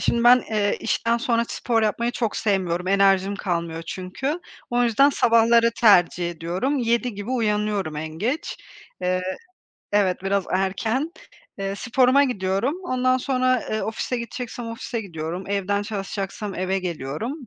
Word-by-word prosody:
şimdi 235 0 +1
ben, 245 0 +7
eee, 205 -2 +1
işten 230 0 +1
sonra 235 -1 +1
spor 230 -2 0
yapmayı 230 +3 0
çok 230 -4 -2
sevmiyorum, 185 -3 0
enerjim 195 0 +3
kalmıyor 170 -4 -3
çünkü. 265 - -3 0.3
O 245 0 +2
yüzden 245 +4 +4
sabahları 230 -2 +4
tercih 175 -5 +5
ediyorum, 175 - -2
7 235 0 0
gibi 205 +4 -6
uyanıyorum 210 -8 0
en 160 +1 -4
geç. 230 - -3 0.5
Eee, 185 0 0 0.7
evet 190 -3 +2
biraz 195 0 +1
erken. 220 - 0 0.5
Iıı, 195 0 -3
sporuma 255 +5 +3
gidiyorum. 200 - 0
Ondan 255 -4 +2
sonra, 255 -1 +1
ııı, 215 - -1
ofise 225 +3 -2
gideceksem 240 0 -6
ofise 230 +1 -4
gidiyorum. 170 -2 -5
Evden 200 0 0
çalışacaksam 200 -1 -4
eve 185 +1 -1
geliyorum 170 - -4
210 Hz, 135 wpm, -23 LUFS, 190-240 Hz, 0.7 s, ben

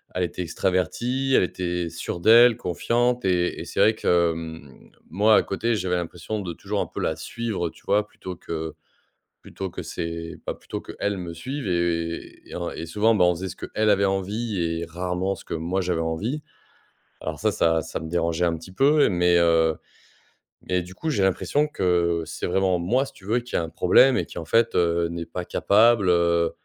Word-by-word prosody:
elle 90 - 0
était 90 - -3
extravertie, 120 +11 -1
elle - - +5
était 90 -1 -2
sûre 85 - -5
d'elle, 115 +4 +7
confiante, 120 +6 0
et 90 -1 +1
et - - -6
c'est - - -5
vrai 110 0 +5
que, 85 -4 +2
mmh, 80 -4 -9 0.2
moi 105 +4 +4
à - - +6
côté, 115 +4 -1
j'avais 90 -2 -1
l'impression 90 +4 -4
de 85 -3 -5
toujours - - -4
un - - -1
peu - - -7
la 80 - 0
suivre, 95 0 -3
tu - - -19
vois? 105 +1 +2
Plutôt 95 -3 -8
que 80 -1 -5 0.7
plutôt 95 -2 -6
que - - -6
c'est, 85 0 -5
bah - - -3
plutôt - - -7
qu'elle 100 -1 -3
me 85 -2 -5
suive 130 - -5
et 85 -1 -2
et - - -9
en 85 -1 -3
et 85 - -6
souvent, 105 +6 +2
ben, 90 -4 +4
on 90 - +3
faisait 95 +3 -5
ce - - -9
qu'elle 110 0 0
avait 100 0 +3
envie 100 +2 -2
et 85 0 -1
rarement 90 +3 -2
ce - - -13
que - - -5
moi 85 +4 -1
j'avais 90 -2 -1
envie. 105 - -2 0.8
Alors - - -5
ça, - - +2
ça 80 -1 +2
ça 80 - -5
me 80 - -6
dérangeait 85 0 0
un 85 -1 +1
petit 85 +4 -12
peu, 145 +9 +4
mais, 90 -2 +3
heu, 80 -1 +3 0.9
et 90 -1 +1
du 90 +1 -11
coup, 160 +10 -4
j'ai 105 -10 +1
l'impression 140 +10 +1
que 85 - +1
c'est 80 +1 -5
vraiment 95 0 +2
moi, 125 +11 +1
si - - -12
tu 95 - -17
veux 115 +4 +1
qui 120 +1 -8
a 85 - +1
un 80 - -5
problème, 125 +11 +5
et - - 0
qui, - - -11
en 80 - -5
fait, 115 0 +2
heu, 85 -1 +2
n'est 85 0 -5
pas 90 +2 -5
capable, 110 -1 +4
heu 85 -1 +3
90 Hz, 205 wpm, -24 LUFS, 85-105 Hz, 0.9 s, d'elle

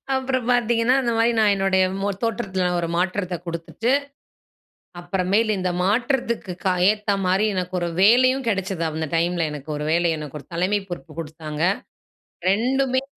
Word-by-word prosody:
அப்புறம் 260 -2 -1
பார்த்தீங்கன்னா, 240 0 +3
அந்த 240 -2 0
மாரி 230 +1 +3
நான் 210 -2 +4
என்னுடைய 190 -1 +2 0.2
மொ 200 - 0
தோற்றத்தில 200 -5 -1
ஒரு 170 - -2
மாற்றத்த 185 0 -1
குடுத்துட்டு, 170 +7 -2 1.1
அப்புறமேலு 195 +5 +1
இந்த 180 -1 0
மாற்றத்திற்கு 235 -2 0
கா 185 - +3 0.2
ஏத்த 210 -1 0
மாரி 190 +3 +2
எனக்கு 185 0 -3
ஒரு 170 - -1
வேலையும் 255 +5 +5
கெடச்சது. 190 -4 -2
அந்த 155 -1 -3
டைம்ல 170 0 +1
எனக்கு 150 +1 -7
ஒரு 150 - -4
வேலை. 170 0 +2 0.3
ஒரு - - -15
தலைமை 190 +4 +1
பொறுப்பு 175 -2 -7
குடுத்தாங்க. 155 0 -5 0.9
2ம்மே 260 +4 +1
195 Hz, 140 wpm, -23 LUFS, 175-230 Hz, 1.1 s, வேலையும்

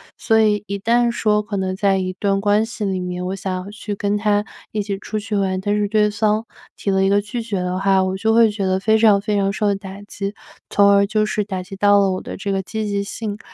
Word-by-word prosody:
所 220 -1 +2
以 210 -1 +2
一 200 0 -3
旦 235 +3 +2
说 210 -3 +1
可 205 -1 -5
能 185 0 -2
在 195 -1 +2
一 185 0 -2
段 195 -1 +1
关 205 +1 +2
系 225 -2 -5
里 190 -1 -1
面， 180 0 -4
我 190 +1 -2
想 185 -1 -4
要 200 - -9
去 210 -1 -5
跟 205 0 -1
他 210 0 +1 0.3
一 210 -1 -2
起 200 -1 -4
出 215 +1 -5
去 210 0 -3
玩， 190 -2 0
但 205 +2 0
是 205 -1 +1
对 210 0 +2
方 215 +1 0 0.3
提 200 - -1
了 190 0 +2
一 195 - +3
个 200 +1 +4
拒 210 +3 -4
绝 205 -4 -3
的 180 +1 -2
话 195 -1 +3
我 185 0 -1
就 220 +3 +1
会 230 -2 +5
觉 205 -2 -4
得 185 0 +1
非 220 +2 +2
常 210 -3 +5
非 210 +1 -2
常 195 0 +1
受 205 0 0
打 195 0 -8
击， 200 0 -5 0.3
从 200 0 +4
而 200 0 +4
就 215 0 +1
是 210 0 -1
打 190 -3 -5
击 195 +1 -9
到 205 +1 +4
了 195 -1 +2
我 185 - -3
的 - - -7
这 200 0 -3
个 195 0 0
积 220 +3 -4
极 200 -1 -1
性， 205 +1 -5
205 Hz, 285 characters per minute, -20 LUFS, 195-210 Hz, 0.3 s, 会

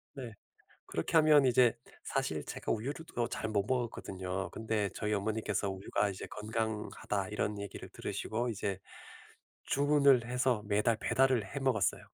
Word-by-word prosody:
네. 125 -5 -6 0.5
그렇게 80 - -1
하면 155 -3 +7
이제 125 -2 +5 0.3
사실 - - -1
제가 - - -5
우유를 135 +8 -3
또 120 -1 +1
잘 110 - -3
못 100 -2 +1
먹었거든요. 95 -7 -2
근데 110 -2 -1
저희 105 0 -2
어머니께서 105 -1 -1
"우유가 100 +1 -1
이제 95 - -6
건강하다." 105 -2 -3
이런 105 0 -1
얘기를 100 - -7
들으시고 120 +3 -3
이제 100 -3 -2 0.9
주문을 140 -3 +4
해서 125 -2 +1
매달 105 +2 +2
배달을 130 -2 +2
해 140 +9 -5
먹었어요. 125 -8 +1
110 Hz, 330 characters per minute, -33 LUFS, 100-125 Hz, 0.9 s, 하면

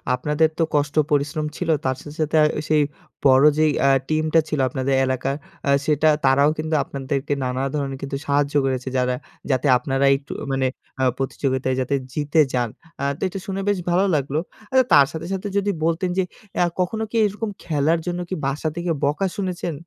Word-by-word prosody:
আপনাদের 150 +4 +1
তো - - +4
কষ্ট 145 +1 0 0.2
পরিশ্রম 150 +2 0
ছিল। 180 - -3 0.2
তার 130 0 +1
শেস 145 - -10
সাথে 155 +1 +1 0.3
সেই 155 -1 +4 0.4
বড় 135 +1 +6
যে 155 - +4
ইয়ে 135 0 +3
টিম 155 0 +1
টা 165 - +7
ছিল 150 - -1
আপনাদের 130 +1 -1
এলাকার 130 +1 -1 0.5
সেটা 155 +1 +3 0.2
তারাও 140 +2 +5
কিন্তু 155 0 -1
আপনাদেরকে 140 +1 -3
নানা 125 +1 -2
ধরণের 140 -2 -2
কিন্তু 140 0 -3
সাহায্য 145 0 +1
করেছে। 130 -1 -2
যারা 125 0 +1 0.4
যাতে 130 +2 +1
আপনার 135 +1 -2
এই 135 - +5 0.4
মানে 135 -1 +1 0.3
আ - - +2
প্রতিযোগিতায় 130 -1 -1
যাতে 140 +2 0 0.2
জিতে 150 +1 0
যান। 120 -2 +1 0.3
আ - - -2
তো - - -21
এটা 195 +1 -5
শুনে 195 0 -2
বেশ 205 - +2
ভালো 185 +3 +3
লাগলো। 140 +1 0 0.3
আ - - -1 0.2
তার 140 - +8
সাথে, 160 0 -6
সাথে 195 +2 -3
যদি 200 0 +1
বলতেন 170 +2 0
যে 190 - +3 0.3
অ্যা 175 - +3
কখনো 220 +5 0
কি - - -6
এরকম 210 +2 -3
খেলার 160 +1 +1
জন্য 175 0 -2 0.3
বাসা 145 +3 -1
থেকে 175 0 -2
বকা 150 +7 +1
শুনেছেন? 180 -3 -3
145 Hz, 180 wpm, -22 LUFS, 135-165 Hz, 0.5 s, তার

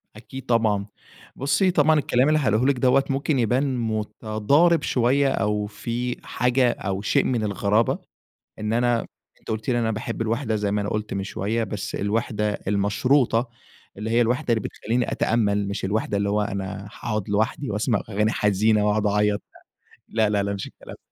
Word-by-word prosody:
أكيد 130 +4 -10
طبعًا، 110 -4 +1 0.5
بصي 140 +8 +2
طبعًا 155 -1 +4
الكلام 130 -1 +2
اللي 155 0 +3
هاقوله 110 -3 +2
لِك 140 0 +3
دوّة 130 +2 +4
ممكن 135 +1 0
يبان 130 +3 +1
متضارب 110 +8 +1
شوية 130 +3 +2
أو 105 0 0
في 120 +4 -4
حاجة 125 0 +2
أو 95 -2 -4
شيء 135 +6 +2
من 120 -4 0
الغرابة، 105 +2 +1 0.6
إن 105 +1 -2
أنا 120 0 +1 0.3
أنتِ - - -10
قلتِ 110 +1 -4
لي 120 - +2
أنا 115 -1 +1
باحب 115 +1 -3
الوِحدة 115 0 -1
زي 105 -1 -1
ما 105 - +1
أنا 100 - -3
قلت 105 0 -3
من 95 0 -2
شوية، 110 +4 -2
بس 100 -1 -5
الوِحدة 105 0 -1
المشروطة، 115 +4 +2 0.5
اللي 110 +2 -4
هي 120 +1 +3
الوِحدة 120 0 +1
اللي 110 - -1
بتخليني 120 +2 -2
أتأمل، 105 -3 +1
مش 100 - -4
الوِحدة 105 +1 -1
اللي 100 0 0
هو 105 +1 +1
أنا 100 0 -4
هاقعد 105 -4 -4
لوحدي 110 +5 -1
وأسمع 105 +1 0
أغاني 105 +1 +1
حزينة 105 +1 +2
واقعد 105 0 +1
أعيط، 105 0 +1 0.7
لا، 110 -2 +1
لا، 100 -1 +1
لا، 100 - -2
ما 100 - -3
فيش - - -5
الكلام - - -12
ده. - - -23
110 Hz, 175 wpm, -24 LUFS, 105-125 Hz, 0.7 s, طبعًا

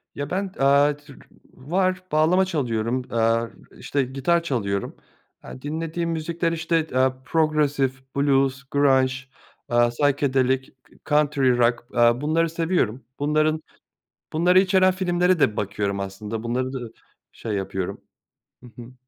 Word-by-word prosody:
Ya 145 +1 -4
ben, 195 +1 -2
eee, 140 +1 +4
tür 145 -2 -16 0.3
var, 185 +6 -1
bağlama 165 +5 +3
çalıyorum, 125 -7 -1
eee, 115 0 -1
işte, 140 -1 -1
gitar 135 +7 0
çalıyorum. 100 - -2 0.5
Eee, 130 - -10
dinlediğim 165 +3 -3
müzikler, 165 +1 -2
işte, 165 -1 0
eee, 130 0 +2
progressive, 150 -4 +1 0.2
blues, 135 -1 +1
grunge, 135 -2 +3 0.6
psychedelic, 130 +2 +1 0.3
country 145 -4 +2
rock, 120 0 +1
eee, 120 +1 +3
bunları 160 +2 +1
seviyorum. 165 - -1 0.2
Bunların, 155 +2 +1 0.7
bunları 175 +3 +4
içeren 185 -1 +3
filmlere 180 -1 +1
de 110 -6 +2
bakıyorum 100 -1 -2
aslında, 105 +3 -5
bunları 130 +2 -2
da 130 - -3 0.5
şey 115 - -6
yapıyorum. 95 -1 -4 0.6
Hı 125 - -12
hı. 120 +2 -12
140 Hz, 120 wpm, -23 LUFS, 120-165 Hz, 0.7 s, eee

